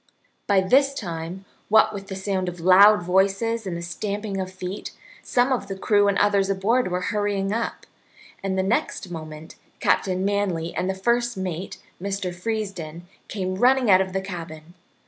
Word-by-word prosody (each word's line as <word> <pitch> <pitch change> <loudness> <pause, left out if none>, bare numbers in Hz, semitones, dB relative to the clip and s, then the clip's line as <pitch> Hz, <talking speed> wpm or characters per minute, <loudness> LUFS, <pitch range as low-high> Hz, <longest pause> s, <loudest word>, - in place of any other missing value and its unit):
By 200 -2 +4
this 275 +8 +3
time, 175 -1 -6 0.2
what 215 0 +5
with 195 -1 -7
the 190 - -5
sound 190 -1 -2
of 175 0 -9
loud 185 +3 +7
voices 195 +5 +1
and 175 -2 -3
the 170 - -6
stamping 200 +2 -3
of 185 0 -5
feet, 185 +1 -6 0.3
some 250 +2 +1
of 230 -6 -2
the 195 -1 -5
crew 205 +1 +3
and 200 0 +2
others 200 -1 +2
aboard 205 +5 +1
were 180 0 -1
hurrying 205 -1 0
up, 230 +1 -3 0.6
and 195 -1 -2
the 190 - +2
next 195 -2 -1
moment 155 -1 -8 0.2
Captain 185 0 +1
Manly 195 -5 -1
and 185 - -2
the 190 - -1
first 240 +3 0
mate, 185 0 -4 0.2
Mr. 195 -2 -3
Freesden, 180 -5 -4 0.2
came 185 -3 -3
running 250 0 +4
out 185 0 +7
of 190 -1 -2
the 190 +1 -1
cabin. 170 -3 -8
195 Hz, 170 wpm, -24 LUFS, 180-205 Hz, 0.6 s, loud